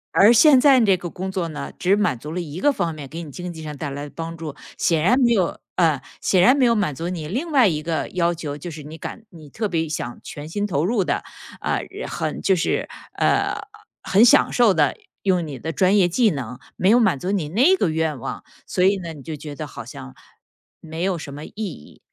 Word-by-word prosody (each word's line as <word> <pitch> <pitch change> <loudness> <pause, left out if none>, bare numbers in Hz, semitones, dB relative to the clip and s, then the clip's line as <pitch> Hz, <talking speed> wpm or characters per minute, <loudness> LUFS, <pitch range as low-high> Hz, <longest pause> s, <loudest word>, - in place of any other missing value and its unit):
而 210 +4 +7
现 260 +2 +7
在 275 -3 +6
这 200 -5 +4
个 175 -1 -6
工 185 +3 -5
作 185 -3 -2
呢， 155 - -6
只 190 +3 +2
满 205 - +1
足 150 +6 -8
了 180 - -3
一 165 +1 -6
个 290 - +4
方 170 - -2
面 150 -2 -8
给 165 +4 -6
你 160 - -8
经 175 +4 -6
济 160 - -9
上 150 -1 -6
带 145 0 -4
来 140 +1 -5
的 - - -9
帮 165 0 -5
助。 155 -3 -6 0.2
显 160 -2 +1
然 250 +8 +4
没 240 -3 +4
有 185 -6 0 0.2
呃， 160 -6 +2 0.2
显 185 -2 +3
然 255 +8 +6
没 270 - +2
有 235 - +5
满 200 -10 0
足 165 +5 -4
你 165 -4 -4
另 280 - -3
外 260 -7 +5
一 155 -3 -1
个 160 -2 -2
要 175 -2 +1
求， 150 -4 -5
就 170 +4 -7
是 155 -1 -8
你 155 +3 -9
感 225 +6 -8
你 155 -4 -13
特 215 +7 -2
别 165 -4 -1
想 120 -5 -4
全 145 +1 -8
心 205 +6 -2
投 160 -5 0
入 205 -1 +1
的， - - -1 0.4
啊， - - -1 0.3
很 - - -3
就 190 - +3
是， 170 - -1 0.3
呃， - - +2 0.5
很 200 +4 +4
享 240 - +5
受 235 -5 +5
地 155 -4 +2 0.3
用 180 -3 +2
你 140 -4 -7
的 160 +6 -4
专 190 +4 +3
业 185 -3 +5
技 220 +6 +3
能， 125 - -5 0.2
没 185 - +2
有 235 - +6
满 220 - +3
足 185 +7 -2
你 175 -7 -1
那 260 - +4
个 195 - +1
愿 160 -2 -1
望， - - -6 0.2
所 180 - -2
以 195 +2 +4
呢 170 -3 -6
你 150 -3 -10
就 155 +3 -6
觉 150 0 -8
得 - - -6
好 - - -8
像， 65 0 -10 0.6
没 160 +1 -6
有 190 -2 0
什 145 -3 -8
么 145 +2 -8
意 - - -10
义。 190 - -7
170 Hz, 265 characters per minute, -22 LUFS, 155-200 Hz, 0.6 s, 而